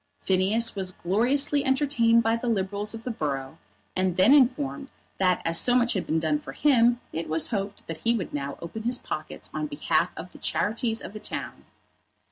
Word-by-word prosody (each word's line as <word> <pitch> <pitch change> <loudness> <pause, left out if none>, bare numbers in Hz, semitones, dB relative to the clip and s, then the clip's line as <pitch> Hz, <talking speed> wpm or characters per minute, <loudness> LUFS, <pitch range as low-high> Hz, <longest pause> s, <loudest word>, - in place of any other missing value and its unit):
Phineas 195 +5 +2
was 190 -2 -3
gloriously 265 +11 +1
entertained 265 -4 +3
by 225 +1 +2
the 230 +1 -4
Liberals 205 0 -1
of 225 - -9
the 250 - -3
borough, 135 -9 -4 0.4
and 185 -1 0
then 195 +9 +6
informed 280 +1 +2 0.3
that 185 -2 +2
as 165 0 +2
so 245 - +4
much 240 -1 +3
had 190 - -3
been 160 - +1
done 155 -2 0
for - - -9
him 240 -4 +3
it 165 0 -4
was 160 +1 0
hoped 200 -2 -4
that 165 - -7
he 235 +1 +1
would 190 - -5
now 140 -1 -4
open 195 +6 -6
his 240 +2 0
pockets - - -7
on 305 - -2
behalf 290 -1 0
of - - -8
the - - -14
charities 225 +1 -1
of - - -8
the 215 - -7
town. - - -5
220 Hz, 195 wpm, -26 LUFS, 185-245 Hz, 0.4 s, then